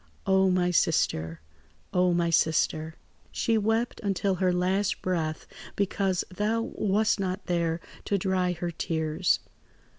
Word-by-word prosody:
"Oh, 190 0 +4
my 180 -1 +2
sister! 80 - +1 0.5
Oh, 180 0 +3
my 170 -1 +1
sister! 160 0 +1 0.4
"She 230 - 0
wept 225 +3 0
until 195 -1 0
her 185 -1 +3
last 185 +3 0
breath, 160 -4 -2 0.3
because 195 -2 0
thou 220 +3 0
wast 210 +1 +1
not 190 0 -3
there 170 -1 0 0.3
to 200 - +1
dry 185 -1 0
her 175 0 -4
tears. 160 -1 0
180 Hz, 125 wpm, -27 LUFS, 170-200 Hz, 0.5 s, Oh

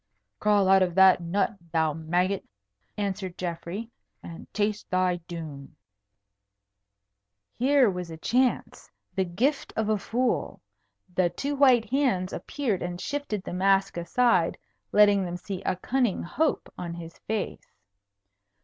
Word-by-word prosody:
"Crawl 205 -2 +3
out 190 0 +6
of 180 -2 +1
that 190 -1 +6
nut, 195 +4 0
thou 160 -2 +2
maggot," 175 +5 0 0.5
answered 195 -3 -3
Geoffrey, 180 +6 -5 0.3
"and 165 - -10
taste 210 0 -1
thy 185 -1 +1
doom." 155 -5 -8 1.8
Here 270 0 +4
was 180 -3 -3
a 160 - -7
chance, 250 +8 0 0.2
the 190 - 0
gift 245 - -1
of 220 -1 0
a 215 -1 +2
fool. 245 +6 -1 0.5
The 180 -1 +2
two 285 +10 -3
white 260 -5 +5
hands 245 -10 +1
appeared 240 -10 -2
and 175 0 -4
shifted 250 -6 -3
the - - -6
mask 195 +1 +2
aside, 180 0 +2 0.3
letting 205 -1 +5
them 175 -1 -4
see 185 +1 -6
a 185 - -1
cunning 240 +2 0
hope 305 - -1
on 170 -1 -5
his 165 -1 -10
face. 215 -2 -4
190 Hz, 130 wpm, -27 LUFS, 175-225 Hz, 1.8 s, out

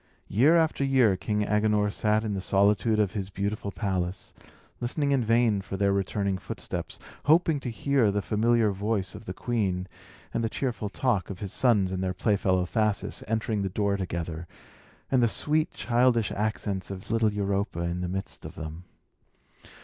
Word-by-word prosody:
Year 135 - +5
after 160 -3 +2
year 130 -7 +4
King 105 +2 -1
Agenor 105 -1 +2
sat 105 +1 +1
in 105 -2 -2
the 95 - -2
solitude 100 +3 +3
of 105 -3 +2
his 95 -3 -4
beautiful 100 +1 -3
palace, 95 -3 -3 0.5
listening 140 +4 -1
in 135 -3 +2
vain 115 -2 +3
for 95 0 -6
their 100 0 +2
returning 100 0 -1
footsteps, - - -5 0.3
hoping 160 0 +4
to 130 - -4
hear 125 -1 +2
the 100 0 -1
familiar 110 +1 +2
voice 100 -1 -2
of 105 +1 -10
the 90 - -5
queen, 95 -7 -1 0.5
and 115 - 0
the 115 - 0
cheerful 115 -4 -2
talk 105 -5 0
of 100 - -5
his 100 -1 -5
sons 105 -7 +3
and 95 0 -2
their 95 -1 -1
playfellow 95 -2 +1
Thasus, 105 +2 -1
entering 110 -1 -1
the 95 - -1
door 100 +1 0
together, 85 -3 -4 0.6
and 130 -2 +4
the 120 - +5
sweet, 155 +7 +1
childish 120 -2 +2
accents 105 -2 -2
of 95 +2 -7
little 115 -1 +3
Europa 100 -3 -1
in 85 +1 -2
the 90 - -2
midst 95 +1 -5
of - - -8
them. 80 +3 -7
105 Hz, 170 wpm, -27 LUFS, 95-115 Hz, 0.6 s, Year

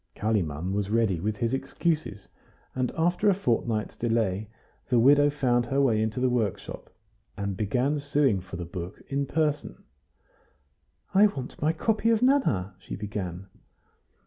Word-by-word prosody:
Kalimann 95 -5 -1
was 100 -1 -1
ready 110 -5 +2
with 105 +4 -2
his 115 0 -1
excuses, 150 - -2 0.5
and 130 -1 0
after 175 +5 +2
a 195 - +4
fortnight's 115 - -1
delay 110 -3 0 0.4
the 125 - +3
widow 145 +4 +6
found 125 -4 +1
her 135 +3 0
way 115 -6 +3
into 110 +2 -1
the 130 - +2
workshop, 115 -6 -2 0.5
and 100 -1 -2
began 125 +9 0
suing 140 -8 +1
for 95 0 -9
the 85 0 -5
book 85 +1 -7
in 140 0 -1
person. 150 - -1 1.3
"I 200 +2 +7
want 135 -11 -7
my 155 +2 +3
copy 220 +7 0
of 230 +1 +3
'Nana,'" 120 - +2
she - - -7
began. 95 -3 -5
120 Hz, 145 wpm, -27 LUFS, 100-145 Hz, 1.3 s, I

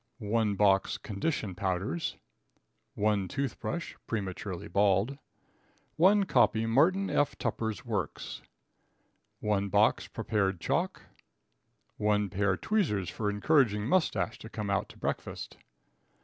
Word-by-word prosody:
1 110 -2 0
box 95 -1 +3
Condition 105 - -2
Powders. 90 -2 -2 0.8
1 105 -2 +1
Toothbrush 140 - -3
(prematurely 95 -3 -4
bald). 100 +8 +2 0.8
1 195 +5 +5
copy 115 - +3
Martin 165 +12 +3
F. 145 - +1
Tupper's 110 0 -3
Works. 105 -9 -3 1.0
1 100 -2 0
box - - +3
Prepared 100 -4 -1
Chalk. - - -1 0.9
1 105 -1 +1
Pair 100 -1 +1
Tweezers 125 - 0
for 105 -2 -2
encouraging 105 -1 +2
Moustache 160 -9 +1
to 110 - -9
come 105 -3 -3
out 100 - 0
to - - -14
breakfast. - - -4
105 Hz, 105 wpm, -30 LUFS, 100-130 Hz, 1.0 s, 1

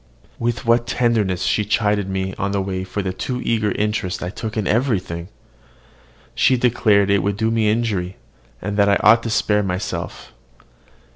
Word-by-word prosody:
With 120 +2 -2
what 120 0 +3
tenderness 110 -7 +1
she 105 - +1
chid 105 -2 0
me 95 0 -2
on 100 0 -1
the 100 - +1
way 95 -1 -3
for 95 +2 -4
the 95 -1 -2
too 125 +6 -4
eager 110 -3 0
interest 105 -3 -2
I 90 - -4
took 110 +2 -6
in 105 - 0
everything! 95 -8 -1 1.1
She 130 - +3
declared 105 -5 +3
it 100 -1 +3
would 100 +1 -1
do 110 +1 0
me 110 -2 +2
injury, 105 -5 -1 0.5
and 100 +1 -3
that 100 -1 +4
I 100 - +4
ought 115 +1 +7
to 115 - -4
spare 105 -1 +2
myself. 95 0 -4
105 Hz, 170 wpm, -20 LUFS, 95-115 Hz, 1.1 s, ought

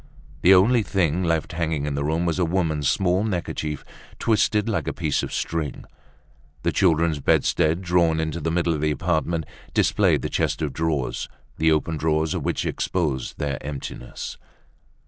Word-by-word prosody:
The 95 +2 +7
only 115 +6 +5
thing 90 -4 0
left 80 -2 0
hanging 80 -3 -1
in 75 - -2
the 70 +1 -1
room 80 +4 0
was 85 +1 0
a - - +3
woman's 80 -4 +1
small 95 +1 +2
neckerchief, 85 -7 -3 0.3
twisted 105 -1 +2
like 110 - -1
a - - -1
piece 80 -5 0
of - - -5
string. 80 -3 -3 0.8
The - - +2
children's 85 -4 +2
bedstead, 80 +5 +2
drawn 85 -2 +2
into 80 +1 -2
the 80 +1 -1
middle 85 0 +1
of 75 - -3
the 75 - +2
apartment, 85 0 0 0.3
displayed - - +3
the - - 0
chest - - 0
of 70 -3 -2
drawers, 80 -5 -1 0.3
the 80 0 +3
open 80 +1 0
drawers 80 0 +1
of - - -3
which - - -1
exposed 75 -8 -2
their 70 -2 -2
emptiness. 70 -3 -6
80 Hz, 165 wpm, -24 LUFS, 75-90 Hz, 0.8 s, The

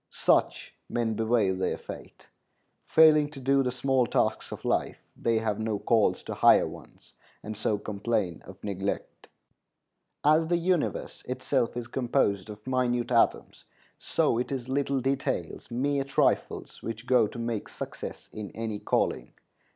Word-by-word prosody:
Such - - +1 0.2
men 115 -2 0
bewail 110 -3 +2
their 95 0 -1
fate. - - -11 0.6
Failing 155 -2 +6
to 150 -2 -10
do 135 +1 +3
the 130 - 0
small 125 0 +1
tasks - - 0
of - - -8
life, - - 0 0.2
they 115 -1 +1
have 110 -2 -1
no 110 -1 -1
calls 110 +1 +2
to - - -5
higher - - +5
ones, - - -13 0.3
and 110 0 -5
so 105 0 0
complain 100 -4 -2
of - - -13
neglect. 100 -1 -4 1.0
As 155 +2 +4
the 175 +1 +2
universe 175 -1 -1
itself 130 -1 -1
is 120 -1 -4
composed 120 -6 0
of 105 0 -10
minute 125 -2 0
atoms, 115 -1 +1 0.3
so 115 - +1
it 125 - -3
is 130 -3 -3
little 140 0 0
details, 135 +1 -2
mere 140 +3 0
trifles, 140 - 0
which 115 +1 -6
go 125 -4 +4
to 120 - -10
make 115 -2 -3
success - - -7
in 105 -2 -6
any 110 -2 -3
calling. - - -1
120 Hz, 150 wpm, -28 LUFS, 110-135 Hz, 1.0 s, Failing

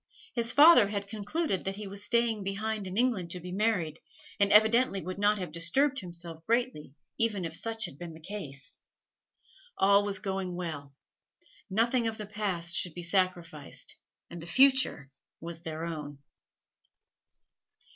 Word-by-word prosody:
His 235 -1 0
father 290 -7 +8
had 200 -1 -3
concluded 210 - -2
that 195 0 -3
he 210 +1 -7
was 200 +1 0
staying 235 -2 +1
behind 205 +1 -3
in 185 +2 -5
England 230 -8 +1
to 180 - -5
be 180 +1 -8
married, 185 -6 0 0.4
and 200 0 +3
evidently 220 +1 +5
would 185 +1 -6
not 205 +1 +3
have 180 -5 -5
disturbed 260 - +2
himself 170 -2 -8
greatly 230 - -1 0.2
even 215 -6 +1
if 165 - -5
such 225 -1 -1
had 145 -6 -9
been 170 -2 -7
the - - -12
case. 155 -6 -7 1.0
All 200 +1 +5
was 200 -1 0
going 190 -2 -3
well. 145 -6 -6 0.7
Nothing 230 +4 +2
of 220 -1 -3
the 210 - -6
past 190 -5 -1
should 175 -4 +1
be 175 - -6
sacrificed, 175 -5 -2 0.3
and 170 -1 -9
the 165 - -9
future 260 - +3 0.3
was 165 0 -6
their 160 -1 -5
own. 150 -4 -6
195 Hz, 155 wpm, -29 LUFS, 170-220 Hz, 1.0 s, father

